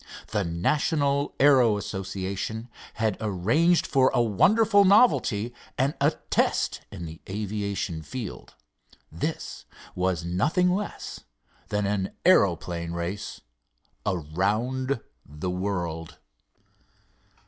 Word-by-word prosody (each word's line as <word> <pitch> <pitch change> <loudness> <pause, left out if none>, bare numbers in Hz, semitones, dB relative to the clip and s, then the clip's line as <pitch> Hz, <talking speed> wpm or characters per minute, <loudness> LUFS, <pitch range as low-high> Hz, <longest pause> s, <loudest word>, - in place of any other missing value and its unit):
The 105 - 0
National 140 - 0
Aero 130 -6 +5
Association 100 +3 -4 0.3
had 110 -3 0
arranged 110 - +2
for 130 -3 +4
a - - +3
wonderful 205 - +4
novelty 160 - +4 0.2
and 135 +3 +2
a - - +5 0.2
test - - +1
in 85 - -7
the 80 0 -9
aviation 100 -4 -3
field. 115 +5 -7 0.6
This - - -4 0.3
was 90 -2 -1
nothing 155 - +2
less 205 +2 -4 0.5
than 105 0 -1
an 100 -1 -1
aeroplane 85 -1 +3
race 85 +4 -4 0.6
around 105 - -1 0.2
the 75 +5 -5
world. 90 -4 -3
105 Hz, 95 wpm, -26 LUFS, 90-130 Hz, 0.6 s, Aero